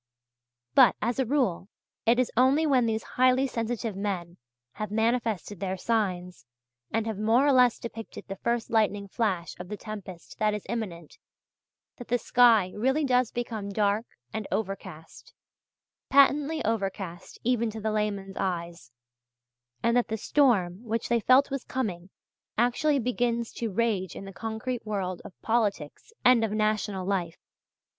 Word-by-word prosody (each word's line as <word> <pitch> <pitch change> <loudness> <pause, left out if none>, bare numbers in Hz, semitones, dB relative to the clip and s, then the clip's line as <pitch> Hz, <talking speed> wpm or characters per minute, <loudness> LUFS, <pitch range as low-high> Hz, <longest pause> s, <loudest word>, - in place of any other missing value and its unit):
But, - - +7
as 235 +4 -1
a 260 - +1
rule, 235 -9 0 0.4
it 235 +1 +5
is 255 -1 +1
only 265 +6 +4
when 260 -5 +3
these 220 0 -1
highly 255 +1 +3
sensitive 230 -3 -3
men 185 -4 -3 0.3
have 215 +9 -5
manifested 220 -3 -1
their 190 0 -2
signs, 180 - -2 0.4
and 225 0 0
have 220 -3 -3
more 225 +5 +3
or 290 - +5
less 250 -3 +5
depicted 225 -1 -8
the 195 0 -6
first 235 +2 -1
lightning 205 -3 +1
flash 190 -5 -1
of 180 0 -8
the 210 - -5
tempest 195 -6 -9
that 210 -1 +2
is 210 - -6
imminent, 185 -9 -5 0.8
that 245 - -9
the 245 - +2
sky 230 -7 +4
really 265 +8 +1
does 250 -3 +2
become 225 -4 -4
dark 205 +2 0 0.3
and 215 -2 -4
overcast 190 -5 -5 0.7
patently 285 +3 +4
overcast 195 -5 -3
even 235 -1 +1
to 220 +1 -6
the 220 0 -1
layman's 200 -2 -2
eyes 170 -8 -3 0.9
and 235 +1 +3
that 245 - +3
the 220 - -2
storm 210 -7 +2
which 230 -1 -2
they 235 0 +3
felt 255 +5 +4
was 275 -2 -3
coming 195 -8 -4 0.5
actually 245 +6 +2
begins 240 -2 -1
to 230 -2 -3
rage 195 -4 0
in - - -7
the 195 - -9
concrete 225 +3 -4
world 195 -4 -3
of 180 - -13
politics 215 - -1
and 250 -2 +6
of 220 - 0
national 215 -3 0
life. 180 -4 -1
220 Hz, 150 wpm, -27 LUFS, 195-240 Hz, 0.9 s, But